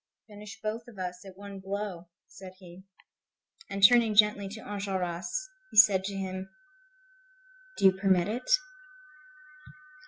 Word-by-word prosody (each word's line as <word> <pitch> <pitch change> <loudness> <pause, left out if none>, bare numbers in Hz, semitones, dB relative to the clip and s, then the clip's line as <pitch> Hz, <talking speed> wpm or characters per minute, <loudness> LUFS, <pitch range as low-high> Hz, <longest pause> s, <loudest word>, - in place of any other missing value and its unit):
"Finish 210 -1 -11
both 225 +2 -4
of 235 -4 -14
us 180 -1 -6
at 190 -1 -13
one 200 -1 -9
blow," 195 -2 -5 0.2
said 190 -2 -12
he. 185 0 -14 0.8
And 195 0 -5
turning 230 -2 +3
gently 210 -1 +4
to 215 +2 -9
Enjolras, 190 -4 -4 0.4
he - - -10
said 195 -3 +7
to 200 0 -4
him: 190 0 -5 1.3
"Do - - 0
you 190 - +8
permit 190 -2 +1
it?" 240 +4 -5
195 Hz, 130 wpm, -28 LUFS, 185-210 Hz, 1.3 s, you